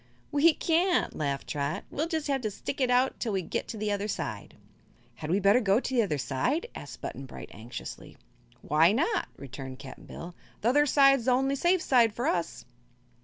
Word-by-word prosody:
"We 300 +2 +5
can't," 350 +2 +1
laughed 140 -3 -2
Trot. 145 0 -2
"We'll 310 +3 -1
jus' 320 -3 -2
have 275 -2 0
to 215 - -1
stick 265 +7 -5
it 255 - +2
out 250 +1 +2
till 225 -4 -2
we 190 -1 0
get - - -3
to 225 - -6
the 210 0 -1
other 205 0 -1
side." - - -5 0.6
"Had 155 - -6
we 185 +4 +2
better 200 +4 +5
go 205 -2 +3
to 265 - -4
the 240 - +5
other 185 -9 0
side?" 140 - -1
asked - - -9
Button 135 - -6
Bright, - - -10
anxiously. 115 +4 -9 0.5
"Why 160 +5 +4
not?" 330 - +1
returned 130 -1 -8
Cap'n 135 -1 -11
Bill. 175 +1 -8 0.3
"The 230 - +3
other 290 +3 +4
side's 275 -3 +5
the 255 - +3
only 270 +2 +2
safe 345 +5 +2
side 235 -4 +4
for 240 - -2
us." 170 -2 -1
225 Hz, 200 wpm, -28 LUFS, -, 0.6 s, We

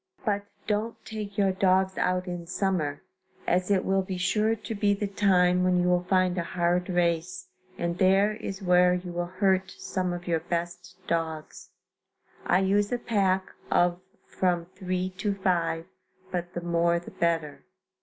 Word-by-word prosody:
But 205 -2 0 0.2
don't 215 +2 -1
take 210 -2 -6
your 195 -2 +3
dogs 190 0 +2
out 180 0 0
in 175 -2 -6
summer, 175 -6 -1 0.4
as 180 +1 +1
it 195 -2 +2
will 195 0 +2
be 185 0 -4
sure 210 +5 +1
to 220 +1 -6
be 205 -1 +2
the 205 - -2
time 180 -3 +3
when 180 -1 +3
you 175 - +2
will 180 0 +2
find 185 -1 +2
a - - -1
hard 175 +1 0
race, 175 - 0 0.3
and 170 0 -2
there 195 +2 +4
is 195 -2 -6
where 180 0 +5
you 180 0 -5
will 175 0 -2
hurt 190 +1 +1
some 185 -2 -2
of 175 0 -5
your 165 -2 +1
best 175 +1 -4
dogs. 160 -2 -3 0.8
I 180 +2 +4
use 200 +2 +2
a 245 - +1
pack 195 -5 0 0.2
of 175 0 +2 0.3
from 175 -2 0
three 185 0 -2
to 200 +1 -1
five, 170 -4 0 0.5
but 175 -1 -4
the 175 - -2
more 170 0 +2
the 170 - -8
better. 165 -3 -1
180 Hz, 165 wpm, -27 LUFS, 175-195 Hz, 0.8 s, where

